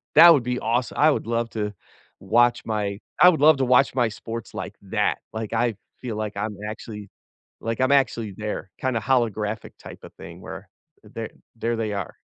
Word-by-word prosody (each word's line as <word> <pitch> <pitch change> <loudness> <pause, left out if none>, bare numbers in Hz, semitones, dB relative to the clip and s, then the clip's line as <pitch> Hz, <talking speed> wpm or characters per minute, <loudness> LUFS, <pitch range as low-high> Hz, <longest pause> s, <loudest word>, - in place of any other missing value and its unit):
that 170 - +10
would 140 -6 +2
be 125 +1 -1
aweso 120 +2 -1
I 155 +1 +5
would 140 - -2
love 115 0 -1
to 105 -2 -2 0.5
watch 120 +4 +3
my 105 -2 -2 0.2
I 180 - +10
would 160 -5 +1
love 155 0 +7
to 135 - +1
watch 125 +2 +4
my 120 -3 +2
sports 115 +1 -7
like - - -5
that, - - +1
like, 110 0 -4
I 115 0 +1 0.3
feel 115 -4 -4
like 105 -1 -3
I'm 105 +1 -3
actually 105 -2 -8 0.5
like, 115 +1 -3
I'm 130 +1 +3
actually 115 -6 +1
there, 105 -2 -4
kinda 130 -3 0
holographic 110 -4 0
type - - -11
of - - -12
thing - - -11
where - - -9 0.4
there - - -7 0.3
there 115 +1 -1
they 110 -2 -2
are. 100 -3 -4
115 Hz, 190 wpm, -24 LUFS, 105-125 Hz, 0.5 s, that